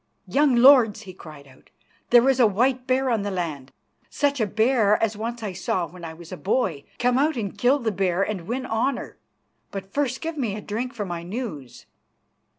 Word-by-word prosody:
"Young 270 +7 +2
lords," 240 -4 +6
he 185 -3 -10
cried 155 -5 -12
out, 130 -1 -21 0.4
"there 240 +1 +6
is 265 -1 +3
a 240 - +6
white 250 +5 0
bear 260 0 +1
on 225 -3 +1
the 205 - -3
land, 160 -8 -4 0.4
such 285 -3 0
a 215 - +1
bear 220 0 +3
as 225 -1 0
once 230 +2 -5
I 200 -3 -4
saw 180 0 -1
when 170 +2 -13
I 165 - -5
was 165 +1 -13
a 185 - -6
boy. 190 - -1
Come 250 +1 +2
out 300 0 +1
and 205 -4 -4
kill 245 +7 +3
the 230 -5 -2
bear 190 -1 0
and 190 -5 -4
win 255 +3 -3
honour, 245 +3 -2 0.5
but 195 -1 -8
first 270 -3 -1
give 325 -2 -4
me 225 -7 -1
a 210 - -6
drink 235 +6 -4
for 210 -3 -3
my 175 -2 -5
news." 175 - -7
220 Hz, 205 wpm, -24 LUFS, 185-255 Hz, 0.5 s, lords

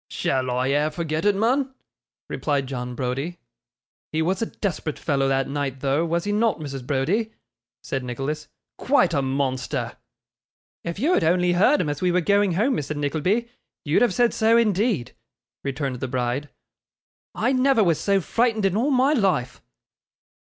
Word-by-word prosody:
'Shall 130 -1 -1
I 125 +1 0
e'er 145 +2 +2
forget 160 +1 -3
it, 205 -1 +4
mun?' 260 +6 +1 0.5
replied 140 -3 -1
John 125 -2 -5
Browdie. 135 +7 -3 0.7
'He 160 +1 0
was 185 +4 0
a 225 - 0
desperate 175 -6 -3
fellow 135 -1 0
that 135 0 +1
night 135 -2 -3
though, 140 +3 +1
was 170 +1 0
he 205 - -2
not, 215 -1 +1
Mrs. 135 -4 -6
Browdie?' 190 +12 0 0.5
said 135 -2 -3
Nicholas. 135 +5 -4 0.3
'Quite 260 -9 +3
a 140 - +2
monster!' 130 -1 -2 0.9
'If 170 +1 -4
you 295 - +2
had - - +2
only 175 +2 +3
heard 215 +12 +4
him 160 - 0
as 145 0 -4
we 180 -1 +2
were 180 - +3
going 200 +1 +2
home, 235 +9 +2
Mr. 150 +1 -3
Nickleby, 160 +11 0 0.4
you'd 150 +2 +2
have 240 -6 +3
said 240 -1 +3
so 225 +1 +4
indeed,' 210 - +1 0.5
returned 140 -2 -3
the 130 - -3
bride. 125 +3 -2 0.9
'I 250 - +1
never 260 -3 +3
was 170 -5 +2
so 200 -1 +2
frightened 225 +2 +1
in 195 -1 +1
all 240 +7 +1
my 270 +2 +3
life. 185 - 0
165 Hz, 165 wpm, -24 LUFS, 135-215 Hz, 0.9 s, it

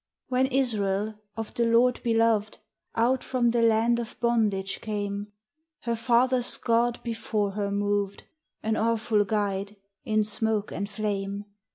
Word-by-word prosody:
When 260 +1 +2
Israel, 215 -6 0 0.2
of 225 -1 -5
the 235 - +1
Lord 240 +2 +3
beloved, 225 -2 +2 0.4
Out 240 +3 +2
from 240 -2 +1
the 235 0 +2
land 230 +1 +3
of 235 -1 -6
bondage 215 -5 +1
came, 205 -1 -3 0.5
Her 235 -1 -1
fathers' 245 +2 +2
God 235 0 +1
before 220 -3 -1
her 200 0 -2
moved, 205 0 -1 0.4
An 220 0 +1
awful 220 -1 +2
guide, 200 -1 -1 0.3
in 215 -1 +2
smoke 215 0 0
and 200 +1 -3
flame. 200 -1 -3
220 Hz, 135 wpm, -27 LUFS, 205-235 Hz, 0.5 s, Lord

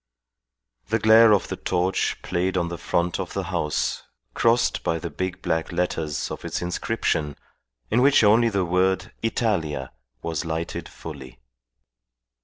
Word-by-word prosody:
The 110 - +1
glare 110 +1 +7
of 100 - +3
the - - -2
torch 90 +1 -1
played 90 +2 -1
on 85 -1 0
the 85 - -5
front 85 0 0
of - - -4
the - - -2
house 75 -1 -1 0.3
crossed 115 +1 +2
by 80 - 0
the 85 -1 -6
big 90 +4 -4
black 80 -2 -1
letters 85 -4 -2
of - - -6
its - - -3
inscription 90 -5 -1 0.6
in 120 - +3
which 140 -2 +5
only 115 +3 +5
the 100 -3 0
word 95 +3 +1
Italia 105 -9 -1 0.3
was 80 -2 -2
lighted 80 0 -4
fully. 65 -6 -10
90 Hz, 145 wpm, -24 LUFS, 80-105 Hz, 0.6 s, glare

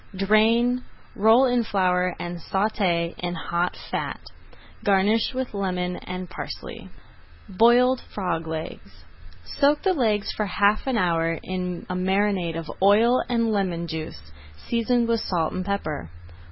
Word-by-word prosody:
Drain, 225 +5 +3 0.3
roll 225 +4 +5
in 245 -2 +2
flour, 180 -4 +1
and 175 0 -5
sauté 185 -3 0
in 175 0 -3
hot 170 +2 -2
fat. - - -3 0.6
Garnish 205 +5 +2
with 260 -2 -3
lemon 180 -3 -2
and 180 0 -6
parsley. - - -8 0.6
BROILED 240 +5 +4
FROG 170 -5 -3
LEGS 160 0 -7 0.4
Soak 290 +1 +1
the 380 -1 +3
legs 215 - 0
for 210 - -2
half 205 +5 +2
an 260 -3 +1
hour 165 -3 +1
in 180 -1 -4
a - - -4
marinade 185 -2 0
of 165 -2 -6
oil 220 +6 +5
and 230 -2 +1
lemon 185 -5 -1
juice, 155 - -7 0.4
seasoned 235 0 +1
with 230 -1 +1
salt 165 -6 -1
and 185 - -3
pepper. 155 - -3
195 Hz, 135 wpm, -24 LUFS, 175-230 Hz, 0.6 s, roll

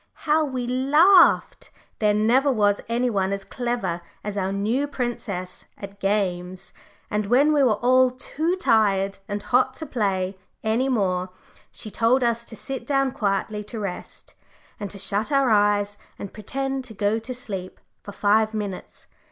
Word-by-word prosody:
How 310 +1 +3
we 260 -4 -3
laughed! 295 +9 +4 0.3
there 210 -1 +3
never 245 +7 +3
was 205 -4 +2
any 240 +1 +1
one 195 -2 0
as 200 0 -3
clever 240 -8 -3 0.2
as 210 -1 -4
our 190 -1 -1
new 220 +8 0
princess 230 -9 -5
at 200 0 -10
games. 185 -3 -2 0.4
And 210 -1 -1
when 275 +7 +4
we 290 - +3
were 245 -6 +4
all 255 +3 +4
too 310 +7 -2
tired 200 - +2
and 205 0 -4
hot 255 +1 +2
to 315 - -6
play 195 -7 -1 0.2
any 230 +5 +1
more, 185 -6 0 0.4
she 215 - -7
told 240 +4 +2
us 235 0 0
to 225 - -10
sit 250 +2 -6
down 275 -2 +1
quietly 210 0 -2
to 225 +1 -7
rest, 195 -4 -7 0.5
and 205 -2 -4
to 200 - -9
shut 200 +5 0
our 275 -4 +3
eyes, 205 -1 +2 0.2
and 200 - -8
pretend 270 +5 -3
to 225 -3 -12
go 205 +3 +1
to 225 +3 -8
sleep 205 -8 -6 0.2
for 205 - -9
five 215 +2 +2
minutes. 205 -3 -6
220 Hz, 160 wpm, -24 LUFS, 200-255 Hz, 0.5 s, laughed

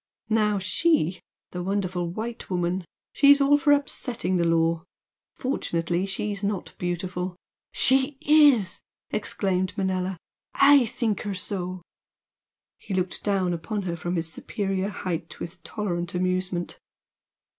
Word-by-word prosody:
Now 210 -2 +3
she 190 - +1 0.3
the 180 - -4
wonderful 185 -2 -1
white 225 +6 -5
woman 180 0 -1 0.3
she's 285 0 +6
all 280 +1 +5
for 290 0 +3
upsetting 250 -9 +1
the 170 - +2
law! 165 0 +2 0.5
Fortunately 175 - -1
she's 200 +1 -3
not 200 -2 -2
beautiful 180 +1 -3 0.2
" - - -68
"She 265 +2 +2
IS!" 290 - +5 0.3
exclaimed 190 -2 -1
Manella 190 -1 -1 0.4
"I 280 -3 +6
think 225 -3 -1
her 205 -2 -3
so!" 185 -1 -4 1.0
He 195 - -5
looked 185 -1 -2
down 190 -3 +1
upon 200 +5 -3
her 175 -2 -2
from 175 +2 -3
his 165 -1 -1
superior 195 -1 -2
height 175 -4 -5
with 175 +2 -6
a - - -41
tolerant 175 -4 -3
amusement. 185 -1 -1
190 Hz, 130 wpm, -26 LUFS, 180-215 Hz, 1.0 s, she's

